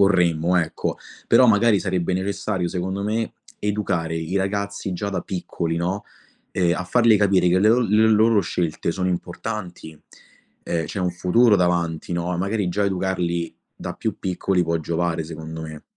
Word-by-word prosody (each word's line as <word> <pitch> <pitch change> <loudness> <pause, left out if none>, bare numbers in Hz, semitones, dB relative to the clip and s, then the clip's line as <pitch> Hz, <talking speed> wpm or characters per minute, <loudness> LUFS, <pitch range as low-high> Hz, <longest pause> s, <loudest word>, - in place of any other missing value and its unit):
vorremmo, 90 -3 +3
ecco. 80 -2 -1 0.3
Però 130 - +6
magari 105 -1 +4
sarebbe 95 -2 -1
necessario 95 -1 -2
secondo 95 +2 -3
me 110 +2 -2 0.2
educare 95 -6 -1
i 80 +4 -3
ragazzi 100 0 -2
già 100 +3 -3
da 95 - -2
piccoli, 85 -3 -3
no, 90 +4 -2 0.5
ehm, 85 -2 +2
a 90 - -3
fargli 115 +2 +4
capire 100 -3 +3
che 90 - +3
le 105 +3 +4
o 125 +2 +4
le 110 -1 +3
loro 110 0 +4
scelte 85 -2 -2
sono 90 +1 -1
importanti, 90 -3 -5 0.6
ehm, 80 -1 -2
c'è 100 - -4
un 90 - +1
futuro 100 +6 +4
davanti, 85 -2 0
no, 85 +1 -2
e - - -1
magari 100 0 -1
già 100 +3 0
educarli 90 -3 -1 0.2
da - - -5
più - - -3
piccoli 90 0 0
può 85 0 0
giovare, 85 +1 -1
secondo 80 0 -7
me. 80 -1 -8
90 Hz, 165 wpm, -22 LUFS, 85-100 Hz, 0.6 s, Però